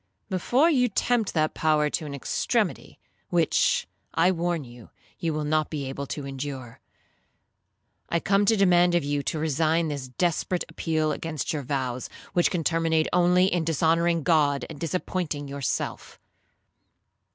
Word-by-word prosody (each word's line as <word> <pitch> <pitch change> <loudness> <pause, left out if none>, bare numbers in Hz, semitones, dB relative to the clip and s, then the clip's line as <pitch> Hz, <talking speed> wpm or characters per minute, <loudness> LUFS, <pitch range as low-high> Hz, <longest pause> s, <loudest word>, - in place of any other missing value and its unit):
'—'Before 240 - +2
you 255 -7 +3
tempt 225 0 0
that 155 -1 +1
power 155 -1 +2
to 150 +1 -3
an 140 - -5
extremity, 140 - -1 0.3
which, - - +2 0.3
I 170 +3 +4
warn 170 -2 -1
you, 120 -2 -13 0.3
you 165 - -1
will 155 0 -2
not 155 +1 +1
be 145 -3 -4
able 140 +1 -5
to 145 +1 -5
endure, 135 -3 -6 1.3
I 170 - +1
come 195 +3 +2
to 220 +2 +3
demand 175 -2 +4
of 175 - +2
you 145 0 -1
to 155 - -2
resign 160 +2 +1
this 140 -3 -4
desperate 175 +6 -1
appeal 155 -1 -1
against 160 +1 -3
your 150 - -2
vows, 130 -2 -3 0.2
which 175 - +3
can 175 -3 -2
terminate 165 -1 +1
only 180 +1 +4
in 175 -3 +1
dishonouring 165 +1 +2
God, 145 -5 +2
and 150 - -9
disappointing 165 -3 -3
yourself.' 140 -2 -4
160 Hz, 150 wpm, -26 LUFS, 145-175 Hz, 1.3 s, I